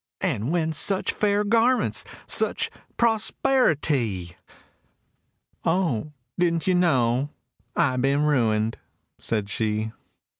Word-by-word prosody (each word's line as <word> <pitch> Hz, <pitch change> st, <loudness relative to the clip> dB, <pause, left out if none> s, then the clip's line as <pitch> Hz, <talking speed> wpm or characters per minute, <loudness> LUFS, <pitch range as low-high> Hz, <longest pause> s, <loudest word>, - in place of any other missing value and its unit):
And 115 Hz, +8 st, -1 dB
whence 160 Hz, -3 st, +1 dB
such 195 Hz, -1 st, +3 dB
fair 205 Hz, 0 st, +1 dB
garments, 230 Hz, +4 st, +2 dB, 0.2 s
such -, -, +1 dB, 0.3 s
prosperi 235 Hz, -1 st, +2 dB
ty?"— 105 Hz, -, -2 dB, 1.3 s
"O 165 Hz, -, 0 dB, 0.3 s
didn't 170 Hz, -2 st, +1 dB
you 185 Hz, -, +2 dB
know 135 Hz, -6 st, +2 dB, 0.5 s
I'd 130 Hz, -7 st, +1 dB
been 140 Hz, +2 st, +2 dB
ruined?" 115 Hz, -7 st, +1 dB, 0.4 s
said 105 Hz, -3 st, -2 dB
she. 110 Hz, +1 st, -2 dB
150 Hz, 100 wpm, -24 LUFS, 115-185 Hz, 1.3 s, such